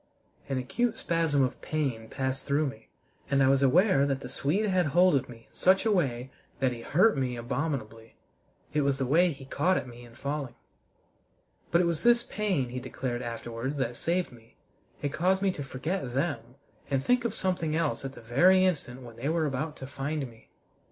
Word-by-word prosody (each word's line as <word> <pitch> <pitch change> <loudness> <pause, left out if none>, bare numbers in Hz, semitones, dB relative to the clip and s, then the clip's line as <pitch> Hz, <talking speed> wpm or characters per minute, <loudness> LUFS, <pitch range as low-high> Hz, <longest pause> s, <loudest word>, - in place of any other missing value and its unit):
An 135 - 0
acute 225 - -1
spasm 165 -5 +1
of 130 - -2
pain 130 -8 -2
passed 130 -1 -2
through 145 +2 +1
me, 110 -6 -7 0.4
and 140 -1 +3
I - - +5
was 135 0 +3
aware 140 +1 +4
that 135 -1 -1
the 125 - -7
Swede 160 +11 0
had 185 -4 +2
hold 175 +5 +4
of 135 - 0
me 115 -1 -12
in - - -32
such 190 +3 +3
a 220 - +3
way 135 - 0 0.3
that 130 -2 +2
he 120 -1 -6
hurt 185 - +3
me 130 -3 -1
abominably. 115 -3 -4 0.6
It 150 - +2
was 140 -1 +1
the 135 - -1
way 170 +7 +4
he 135 -2 -10
caught 170 +7 +1
at - - -3
me 120 0 -11
in 120 -1 -15
falling. 140 -2 -4 1.1
But 170 - +4
it - - +2
was 170 -2 0
this 240 0 +4
pain, 190 -12 -1
he 125 +1 -4
declared 125 -1 -4
afterwards, 120 +3 -4
that 120 -3 -1
saved 175 +6 -1
me: 115 -2 -18 0.5
it 145 0 -1
caused 190 +4 +2
me 195 - +3
to 145 - -6
forget 135 0 -4
them 135 -4 -2 0.3
and 135 -1 0
think 250 - +2
of 230 -2 -2
something 180 -6 -1
else 160 -4 0
at 135 0 -5
the - - -12
very 180 +12 +5
instant 130 -8 -2
when 115 -2 -11
they 135 +5 -2
were 160 -1 +1
about 150 +2 -3
to 130 - -7
find 140 +2 -3
me. 115 -2 -18
140 Hz, 205 wpm, -28 LUFS, 125-170 Hz, 1.1 s, I